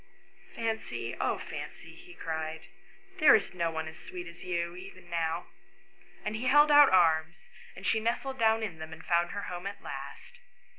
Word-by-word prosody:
" - - -24
Fancy, 225 -1 -3
oh - - +1
Fancy," - - -8
he 370 -1 -14
cried, 160 0 -4 0.3
" 385 0 -23
there 310 -3 +8
is 210 - 0
no 170 -2 0
one 160 0 -3
so 160 - -6
sweet 175 +2 -8
as 170 0 -11
you, 170 -1 -2
even 185 -1 -12
now; 165 0 -1 0.4
" - - -27
and 210 - -2
he 230 +4 -4
held 295 +2 +6
out 290 -1 +9
his - - 0
arms, 160 -1 +2 0.3
and 190 - -10
she 220 - +3
nestled 260 +4 -2
down 225 0 +3
in 180 -7 -4
them, 160 0 -7
and 160 +1 -12
found 170 0 +2
her 200 - -5
home 180 0 -5
at 200 - -8
last. 485 0 -8
180 Hz, 200 wpm, -30 LUFS, 165-225 Hz, 0.4 s, out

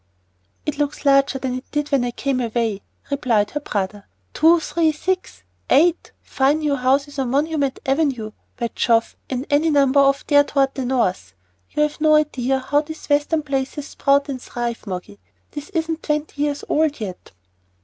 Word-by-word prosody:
"It 300 -1 -3
looks 290 0 -2
larger 275 -1 +4
than 260 -1 -3
it 255 +1 -5
did 295 0 -1
when 275 -3 +3
I 245 - -1
came 265 +2 -2
away," 230 -4 -1 0.3
replied 235 -7 +1
her 295 - -2
brother. 205 -6 -4 0.3
"Two, 330 +2 +5
three, 325 0 +1
six, 370 +4 -3 0.3
eight 335 +4 +3
fine 275 +3 +1
new 300 -2 0
houses 275 +2 0
on 260 -2 -1
Monument 285 0 0
Avenue, 270 -6 0 0.3
by 235 -2 -2
Jove, 230 -1 +1
and 260 +1 -3
any 300 +3 +3
number 280 -2 +4
off 275 0 +3
there 285 -1 +5
toward 275 -2 +1
the 265 - -3
north. 185 - -1 0.3
You've 300 0 -1
no 310 0 +5
idea 270 -4 +1
how 280 +3 +1
these 315 +1 -9
Western 295 +2 +2
places 275 +1 -3
sprout 280 0 +2
and 265 -3 -5
thrive, 240 -2 -5
Moggy. 180 - -6 0.3
This 295 0 -7
isn't 325 -1 -2
twenty 300 -1 -2
years 290 -1 -1
old 310 -2 +1
yet." 185 - -7
275 Hz, 170 wpm, -21 LUFS, 250-300 Hz, 0.3 s, Two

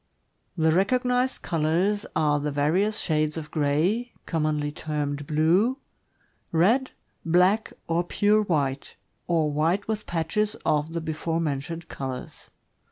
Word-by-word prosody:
— - - -44
The 160 - +5
recognized 250 +7 +1
colors 170 +6 0
are 150 -2 +2
the 150 +1 -2
various 175 +10 +1
shades 155 -3 0
of 155 -1 -6
gray 165 +11 +1
(commonly 150 -2 -1
termed 145 -2 -3
"blue"), 175 - +3 0.7
red, 225 +11 +3 0.3
black, 180 +6 +3 0.2
or 170 +1 +1
pure 205 +4 +2
white, 145 -8 -1 0.3
or 160 -3 +2
white 165 +7 +1
with 215 -1 -3
patches 175 +6 0
of 150 +2 +1
the 170 - -2
before 160 +1 -2
mentioned 160 +2 -3
colors. 130 -4 -7
165 Hz, 125 wpm, -26 LUFS, 150-200 Hz, 0.7 s, The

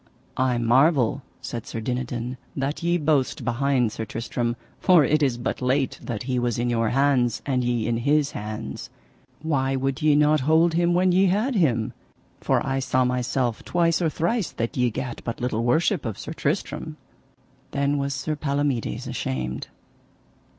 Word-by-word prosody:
I 130 -1 +1
marvel, 130 +2 +3 0.2
said 120 -3 -5
Sir 115 - -4
Dinadan, 125 +1 -3 0.2
that 135 +2 -2
ye 170 +1 +2
boast 150 -4 0
behind 125 -1 +1
Sir 110 - -4
Tristram, 120 +2 -3 0.2
for 180 -5 +5
it 155 +1 +2
is 130 -5 +2
but 120 +2 -3
late 130 +2 0
that 115 -4 -4
he 125 0 -1
was 120 -2 0
in 120 +1 0
your 115 -1 +1
hands, 130 -3 +2
and 130 -3 0
ye 120 -2 0
in 115 0 0
his 145 +4 +2
hands; 105 +2 -6 0.5
why 135 -4 0
would 135 0 -1
ye 150 -1 +4
not 150 +1 +4
hold 160 +4 +3
him 175 +1 +2
when 185 +1 +3
ye 190 +2 +4
had 215 +9 +1
him? 130 - +1 0.5
for - - +1
I 135 0 0
saw 130 -1 +1
myself 125 -1 -1
twice 170 -1 +1
or 165 - +2
thrice 175 +5 -1
that 115 0 -3
ye 125 -1 +2
gat 125 +1 -5
but 115 - -4
little 120 -2 -1
worship 160 - +2
of 110 -4 -4
Sir 155 - -6
Tristram. 155 0 -3 0.7
Then 140 +1 0
was 140 0 -1
Sir 150 +3 -2
Palomides 140 -5 -1
ashamed. 65 0 -3
135 Hz, 170 wpm, -24 LUFS, 120-155 Hz, 0.7 s, for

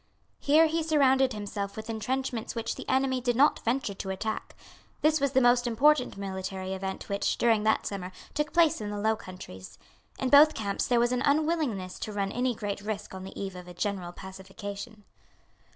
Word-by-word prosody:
Here 310 +3 +5
he 325 +1 0
surrounded 270 -4 +3
himself 205 -2 -4
with 220 +1 -6
entrenchments 240 +1 -3
which 230 -1 -2
the - - -8
enemy 260 -1 +1
did 245 -1 0
not 285 +5 +4
venture 235 -3 0
to 195 0 -6
attack. 215 +3 -4 0.5
This 310 -1 +3
was 280 -1 +1
the 265 - +4
most 245 0 +4
important 250 0 +3
military 190 -1 -4
event 190 0 -5
which, 200 0 0
during 230 -3 +3
that 220 - +2
summer, 190 -2 -4 0.2
took 300 0 -1
place 330 -5 +3
in 210 - -4
the 205 - -4
Low 220 +2 +2
Countries. 180 - -10 0.4
In 260 - -1
both 300 +3 +7
camps 200 -2 -2
there 240 -1 +3
was 240 +1 +2
an 250 0 0
unwillingness 285 - 0
to 215 - -4
run 200 -1 -1
any 250 +1 0
great 205 -2 -4
risk 210 -1 -5
on 190 0 -7
the 190 - -9
eve 195 -2 -4
of 180 0 -9
a 180 - -10
general 190 -2 -2
pacification. 200 +3 -8
220 Hz, 190 wpm, -28 LUFS, 195-265 Hz, 0.5 s, both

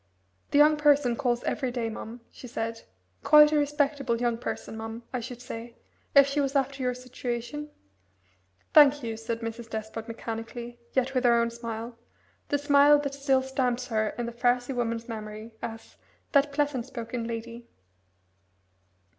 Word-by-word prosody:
"The - - +2
young 300 +1 +6
person 290 -5 +4
calls 240 -2 0
every 260 -3 -1
day, 240 -2 -2
mum," 225 +1 -7
she 250 - -11
said; 225 -1 -4 0.4
"quite 300 0 +8
a - - +2
respectable 285 -4 0
young 240 -1 +1
person, 230 -1 -5
mum, 225 +1 -6
I 250 - 0
should 245 +1 -8
say 235 -1 -8 0.4
if 280 0 +9
she 280 +1 -1
was 275 0 -1
after 275 0 0
your 250 -1 0
situation." 250 +3 -5 1.0
"Thank 290 -2 +7
you," 225 -1 -3
said 225 +1 -4
Mrs. 230 0 -6
Despard 220 +1 -5
mechanically, 230 +1 -6
yet 260 0 +1
with 255 -1 +1
her 235 -1 +5
own 235 0 +1
smile 230 0 -6 0.5
the 290 - +2
smile 285 0 +6
that 280 -1 -3
still 275 -1 +2
stamps 255 -2 -1
her 215 -2 0
in 240 - -2
the 235 - -4
frowsy 245 +2 +1
woman's 230 -1 -2
memory 215 0 -7
as 225 -1 -8 0.3
"that 285 0 +4
pleasant 280 -4 -1
spoken 235 -1 -5
lady." 235 +1 -6
245 Hz, 160 wpm, -27 LUFS, 230-275 Hz, 1.0 s, if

